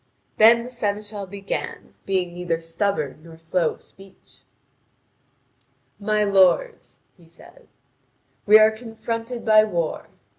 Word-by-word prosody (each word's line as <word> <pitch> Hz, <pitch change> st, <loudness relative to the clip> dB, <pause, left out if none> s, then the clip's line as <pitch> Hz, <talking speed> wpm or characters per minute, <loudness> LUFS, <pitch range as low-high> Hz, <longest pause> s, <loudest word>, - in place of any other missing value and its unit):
Then 230 Hz, +2 st, +6 dB
the 250 Hz, -, -9 dB
seneschal 205 Hz, -3 st, -4 dB
began, 195 Hz, +1 st, -6 dB
being 185 Hz, -3 st, -1 dB
neither 175 Hz, -2 st, -3 dB
stubborn 165 Hz, -3 st, -3 dB
nor 165 Hz, 0 st, -14 dB
slow 165 Hz, 0 st, -1 dB
of -, -, -23 dB
speech: 195 Hz, 0 st, -19 dB, 1.6 s
"My 210 Hz, 0 st, 0 dB
lords," 200 Hz, -, +1 dB
he 170 Hz, -3 st, -22 dB
said, 165 Hz, -, -19 dB, 0.8 s
"we 210 Hz, +1 st, +9 dB
are 215 Hz, 0 st, +5 dB
confronted 230 Hz, +1 st, -6 dB
by 215 Hz, -1 st, +6 dB
war. 170 Hz, -7 st, -3 dB
200 Hz, 115 wpm, -22 LUFS, 175-220 Hz, 1.6 s, we